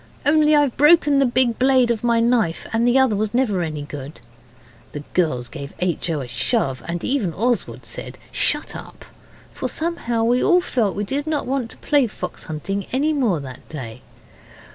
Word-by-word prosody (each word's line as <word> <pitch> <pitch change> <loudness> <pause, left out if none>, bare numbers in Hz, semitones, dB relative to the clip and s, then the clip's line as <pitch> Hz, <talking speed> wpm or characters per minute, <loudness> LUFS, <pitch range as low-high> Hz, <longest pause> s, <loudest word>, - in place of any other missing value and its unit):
Only, 305 +1 +4
I've 290 -4 +2
broken 295 -1 +5
the 275 - +4
big 240 -1 +1
blade 255 -2 +4
of 235 0 -2
my 235 -1 +3
knife, 230 -8 +1
and 230 +2 +2
the 245 +2 +4
other 265 -4 +4 0.2
never 245 -5 +1
was - - 0
any 150 -1 -5
good.' 145 0 -8 0.7
The 145 - -5
girls 140 -9 0
gave 140 0 -9
H. 180 -1 -1
O. 155 -3 -1
a 130 - -6
shove, 135 - 0
and 170 0 -4
even 235 - -1
Oswald 240 +3 -1
said, - - -5
'Shut - - 0
up', - - -10 0.5
for - - -3
somehow 275 -9 -2
we 245 +2 +2
all 360 - +5
felt 235 - -1
we 205 - -2
did 280 +8 -3
not 310 -2 -1
want 260 -2 -2
to - - -13
play 285 -4 +2
fox 180 -4 -7
hunting 195 +6 -4
any 290 +5 +1
more 235 - +1
that 130 -2 -10
day. 125 -8 -7
235 Hz, 185 wpm, -21 LUFS, 170-270 Hz, 0.7 s, broken